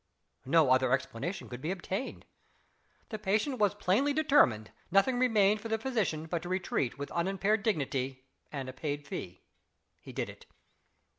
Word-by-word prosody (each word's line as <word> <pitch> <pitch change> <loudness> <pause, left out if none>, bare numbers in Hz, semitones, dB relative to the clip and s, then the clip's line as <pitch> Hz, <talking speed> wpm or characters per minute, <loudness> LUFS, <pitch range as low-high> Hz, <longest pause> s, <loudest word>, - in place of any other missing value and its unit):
No 150 -2 +5
other 130 -1 +4
explanation 130 +7 -2
could 125 0 -8
be 155 - -3
obtained. 195 +5 -4 0.8
The 215 - -5
patient 215 +7 0
was 205 -1 +3
plainly 215 +9 +2
determined 125 - +3 0.2
nothing 195 +7 +3
remained 215 -4 +4
for 225 - -5
the 220 0 0
physician 215 -10 -1
but 165 0 -2
to 175 - -7
retreat 180 -9 -1
with 140 0 -6
unimpaired 195 +5 +1
dignity 135 - -1 0.3
and 135 -3 -4
a 130 - -6
paid 145 +1 -4
fee. 90 -10 -7 0.6
He - - -11
did - - -2
it. - - -12
185 Hz, 155 wpm, -31 LUFS, 135-215 Hz, 0.8 s, No